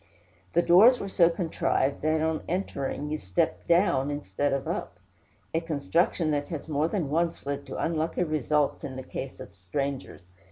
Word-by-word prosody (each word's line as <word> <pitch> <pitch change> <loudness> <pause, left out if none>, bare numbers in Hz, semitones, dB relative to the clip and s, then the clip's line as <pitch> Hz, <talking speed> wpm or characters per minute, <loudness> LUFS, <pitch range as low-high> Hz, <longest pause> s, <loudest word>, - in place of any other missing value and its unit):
The 170 - +4
doors 215 +10 +7
were 200 - -4
so 175 -3 +4
contrived 160 -5 0
that 155 +1 +1
on 160 0 0
entering 150 -5 -3
you 155 - -2
stepped 95 0 -1
down 170 -6 +3
instead 145 -1 -2
of 135 -1 -1
up - - -4 0.6
a 165 - +1
construction 165 +1 0
that 145 -1 -1
has 160 -3 -5
more 150 0 +1
than 170 -6 -2
once 165 0 0
led 140 0 -4
to - - -6
unlucky 160 +2 0
results 150 -2 0
in 130 - -5
the 130 - -6
case 135 +1 -6
of 100 - -10
strangers. 100 0 -5
155 Hz, 170 wpm, -27 LUFS, 140-170 Hz, 0.6 s, doors